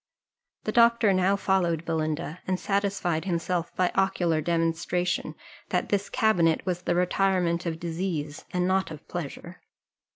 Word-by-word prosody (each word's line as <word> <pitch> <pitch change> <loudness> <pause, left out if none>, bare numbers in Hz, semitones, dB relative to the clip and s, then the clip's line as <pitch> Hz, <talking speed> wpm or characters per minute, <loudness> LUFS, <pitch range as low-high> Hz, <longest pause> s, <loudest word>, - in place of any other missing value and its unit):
The - - -1
doctor 235 -3 +5
now 185 +1 +3
followed 175 -5 +1
Belinda, 155 0 -2
and 185 0 0
satisfied 195 -4 0
himself 175 -1 -1
by 180 -1 +2
ocular 175 -4 +1
demonstration, 170 +2 -1 0.3
that - - 0
this 200 -1 0
cabinet 175 -8 +2
was 180 -2 -1
the 175 - 0
retirement 180 -1 +1
of 165 -1 -3
disease, 165 -3 -3
and 180 0 0
not 190 0 +1
of 155 -2 -10
pleasure. 175 +1 -7
175 Hz, 135 wpm, -27 LUFS, 165-190 Hz, 0.3 s, doctor